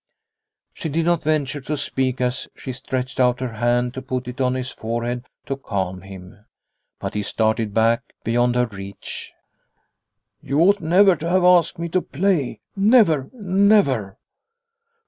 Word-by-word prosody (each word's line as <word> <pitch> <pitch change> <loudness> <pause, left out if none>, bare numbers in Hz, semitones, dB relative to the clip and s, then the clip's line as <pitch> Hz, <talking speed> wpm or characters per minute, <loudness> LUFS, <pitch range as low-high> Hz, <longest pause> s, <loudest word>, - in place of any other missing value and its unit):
She 160 - -5
did 160 +3 0
not 175 -1 +2
venture 145 -2 -1
to 150 +3 -3
speak 130 -2 -1
as 125 +1 -1
she 130 - -6
stretched 130 0 -4
out 125 -1 +3
her 130 -3 -4
hand 120 +1 +1
to 130 - -5
put 130 -1 -4
it 125 +2 -5
on 130 0 +1
his 130 0 -3
forehead 120 +2 -4 0.2
to 135 - -2
calm 95 -8 -3
him, 95 +1 -12 0.6
but - - -4
he 105 - -1
started 110 +1 0
back 115 +3 +3 0.2
beyond 120 +2 +1
her 125 0 +3
reach. 100 -3 -8 0.5
" - - -56
You 140 +3 -1
ought 200 +3 +4
never 180 +4 +5
to 165 +3 -4
have 185 +1 +3
asked 180 -2 +4
me 170 0 -3
to 185 +2 +1
play 170 -4 -1
never 195 - +4
never 190 - +2
130 Hz, 160 wpm, -22 LUFS, 120-165 Hz, 0.6 s, never